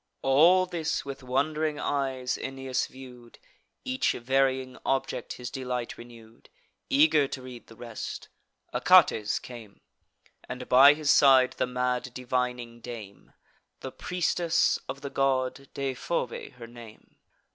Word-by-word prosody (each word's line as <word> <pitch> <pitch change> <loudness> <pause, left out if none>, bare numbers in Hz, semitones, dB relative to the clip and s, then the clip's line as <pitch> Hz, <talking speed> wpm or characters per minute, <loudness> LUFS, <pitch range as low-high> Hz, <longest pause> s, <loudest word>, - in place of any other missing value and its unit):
All 165 +8 +5
this 165 -3 -3
with 140 0 -7
wond'ring 150 +4 -1
eyes 130 -3 -2
Aeneas 135 -1 -3
view'd; 125 -3 -13 0.5
Each 260 0 0
varying 130 +1 0
object 135 0 -2
his 125 -1 -7
delight 125 -2 -4
renew'd: 115 -1 -15 0.4
Eager 275 - +4
to 135 -1 -7
read 125 -2 -11
the 115 - -15
rest, 115 -1 -7 0.5
Achates 105 -1 +4
came, 115 -5 -12 0.7
And 125 0 -6
by 140 +3 +8
his 150 -2 +1
side 130 -2 +6
the - - +1
mad 125 0 -2
divining 125 -2 -3
dame, 110 -5 -10 0.5
The 130 - -6
priestess 175 0 0
of 140 - -6
the 140 -1 -6
god, 135 0 0
Deiphobe 135 0 -3
her 125 -2 -11
name. 115 -2 -14
130 Hz, 125 wpm, -27 LUFS, 125-140 Hz, 0.7 s, by